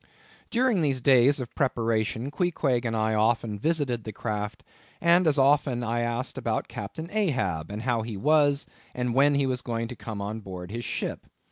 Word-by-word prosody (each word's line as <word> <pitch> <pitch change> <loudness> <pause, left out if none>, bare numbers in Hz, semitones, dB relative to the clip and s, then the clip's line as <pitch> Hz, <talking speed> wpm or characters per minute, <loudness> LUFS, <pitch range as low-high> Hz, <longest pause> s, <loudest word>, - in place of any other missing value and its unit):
During 240 -5 +2
these 140 -4 +1
days 135 +2 +5
of 125 -2 -6
preparation, 115 -1 0
Queequeg 145 -7 0
and 115 -1 -1
I 110 0 +1
often 110 -1 +1
visited 145 -6 0
the 110 - -6
craft, 105 -1 -4 0.4
and 170 +1 +4
as 150 -1 +3
often 135 -3 +3
I 120 0 -1
asked 120 +2 -2
about - - -1
Captain 105 +11 -6
Ahab, 130 - 0
and 105 +2 -5
how 120 -2 +1
he 110 -2 -5
was, 145 +3 +3 0.3
and 125 -1 -1
when 140 +3 +4
he 140 -1 +2
was 130 -1 -1
going 115 -2 -3
to 125 - -6
come 110 -3 -6
on 105 +2 -4
board 90 -3 -8
his 120 +1 -4
ship. - - -4
120 Hz, 180 wpm, -27 LUFS, 110-145 Hz, 0.4 s, days